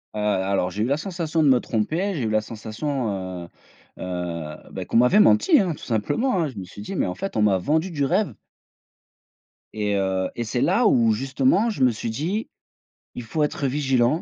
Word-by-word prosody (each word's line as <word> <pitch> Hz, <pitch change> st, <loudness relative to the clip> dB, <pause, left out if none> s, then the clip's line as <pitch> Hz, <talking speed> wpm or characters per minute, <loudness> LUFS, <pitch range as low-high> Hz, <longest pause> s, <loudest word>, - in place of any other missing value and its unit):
Heu, -, -, -3 dB
alors, 100 Hz, -2 st, +1 dB
j'ai 105 Hz, +4 st, -2 dB
eu -, -, +1 dB
la 140 Hz, +4 st, +1 dB
sensation 165 Hz, -2 st, -2 dB
de 150 Hz, -, +4 dB
me 130 Hz, -2 st, +5 dB
tromper, 160 Hz, -, -1 dB
j'ai 145 Hz, -8 st, -3 dB
eu 110 Hz, -, 0 dB
la 110 Hz, 0 st, +2 dB
sensation, 115 Hz, +4 st, -4 dB, 0.4 s
heu -, -, -13 dB, 0.5 s
heu, 85 Hz, -4 st, -5 dB
bah, -, -, -5 dB
qu'on -, -, 0 dB
m'avait 125 Hz, -, +5 dB
menti, 105 Hz, -, +5 dB
hein, 185 Hz, -4 st, +1 dB
tout -, -, -12 dB
simplement, 190 Hz, -, 0 dB
hein, -, -, 0 dB
je 125 Hz, -, -12 dB
me 95 Hz, -, -6 dB
suis 100 Hz, +3 st, -11 dB
dit: -, -, -6 dB
«Mais -, -, +1 dB
en 90 Hz, -, -4 dB
fait, 195 Hz, -, -5 dB
on 110 Hz, -, +2 dB
m'a 100 Hz, -2 st, +4 dB
vendu 160 Hz, -, 0 dB
du 145 Hz, -4 st, 0 dB
rêve». 165 Hz, -, +1 dB, 1.4 s
Et 105 Hz, -1 st, -1 dB
heu 95 Hz, -1 st, 0 dB
et 120 Hz, -, -2 dB
c'est 120 Hz, +2 st, -2 dB
là 210 Hz, +6 st, +3 dB
où, 115 Hz, -, +4 dB
justement, 135 Hz, -, +1 dB
je 135 Hz, -, -1 dB
me 130 Hz, -, +6 dB
suis 110 Hz, 0 st, -4 dB
dit: 175 Hz, -, -2 dB, 0.7 s
«Il 125 Hz, -, -5 dB
faut 135 Hz, +8 st, -3 dB
être 150 Hz, -1 st, -1 dB
vigilant 135 Hz, +1 st, +1 dB
125 Hz, 210 wpm, -23 LUFS, 105-155 Hz, 1.4 s, me